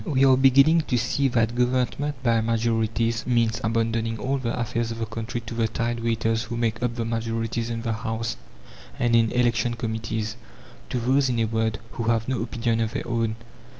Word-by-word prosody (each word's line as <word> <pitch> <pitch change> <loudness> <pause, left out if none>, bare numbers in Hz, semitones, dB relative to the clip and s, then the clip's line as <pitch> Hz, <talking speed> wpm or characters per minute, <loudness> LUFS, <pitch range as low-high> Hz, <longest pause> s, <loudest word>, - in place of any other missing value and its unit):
We 135 -6 +2
are 130 -1 +6
beginning 135 +5 +5
to 125 - +1
see 130 +4 +1
that 120 -2 +1
government 130 +3 0
by 115 -2 +3
majorities 115 0 0
means 115 -2 +1
abandoning 115 0 0
all 135 +5 -1
the 125 -1 -2
affairs 115 0 -1
of 115 - -5
the 115 - -2
country 115 +2 -5
to 115 0 -8
the 115 -1 +1
tide 115 +1 -2
waiters 115 -1 0
who 120 0 -5
make 115 -1 -1
up 120 -1 -1
the 115 -2 -2
majorities 115 0 -2
in 115 -1 -3
the 115 -1 -1
House 115 0 -3 0.6
and 120 -1 +2
in 115 -1 +4
election 120 -1 +1
committees; 110 -1 -3 0.5
to 125 - -1
those, 130 +3 +2
in 120 - 0
a 115 - +2
word, 110 0 0
who 115 - -4
have 115 -1 +1
no 130 -3 -1
opinion 115 -1 -1
of 115 +1 -1
their 135 - -3
own. 115 -2 0
115 Hz, 195 wpm, -25 LUFS, 115-125 Hz, 0.6 s, are